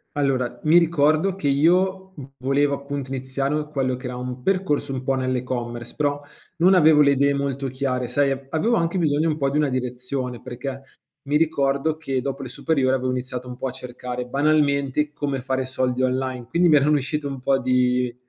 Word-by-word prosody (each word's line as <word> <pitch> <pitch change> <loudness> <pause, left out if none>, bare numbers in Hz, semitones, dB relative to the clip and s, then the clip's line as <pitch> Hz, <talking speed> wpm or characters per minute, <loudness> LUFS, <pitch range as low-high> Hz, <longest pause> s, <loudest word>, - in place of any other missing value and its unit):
Allora 130 -4 0
mi 160 +3 +6
ricordo 160 +2 +3
che 195 - -3
io 185 +6 +2
v 140 - -8
volevo 140 +2 +1
appunto 140 -1 -6
iniziare 135 +3 -2
quello 130 -3 0
che 125 - -10
era 125 0 -4
un 125 0 -6
percorso 180 -7 0
un 130 - -3
po' 135 0 +1
nell'e-commerce, 125 -2 -3
però 145 -1 0 0.4
non 185 +3 +5
avevo 155 -3 +6
le 140 -1 +5
idee 140 +1 +2
molto 140 -1 -2
chiare, 130 -1 -2
sai 140 +3 +1
a 135 0 -4
avevo 220 +9 +1
anche 170 -1 0
bisogno 155 0 +2
un 155 - -1
po' 140 -2 +1
di 145 - -1
una 150 -2 +2
direzione, 125 0 -3
perché 135 +3 -6 0.4
mi 145 +1 -1
ricordo 150 -1 +1
che, 135 -5 -2
dopo 135 +1 -4
le 130 - -7
superiori, 130 0 0
avevo 130 0 -1
iniziato 125 0 -4
un 125 0 -8
po' 130 - -5
a - - -4
cercare 125 0 -6
banalmente 145 0 +1
come 140 -3 -3
fare 130 0 -1
soldi 130 -1 -1
online, 130 -1 -1
quindi 170 +5 +3
mi 150 - +6
erano 150 +2 +4
uscite 145 +2 -3
un 135 -1 -4
po' 135 +1 +2
di 125 -1 +1
135 Hz, 195 wpm, -23 LUFS, 130-150 Hz, 0.4 s, mi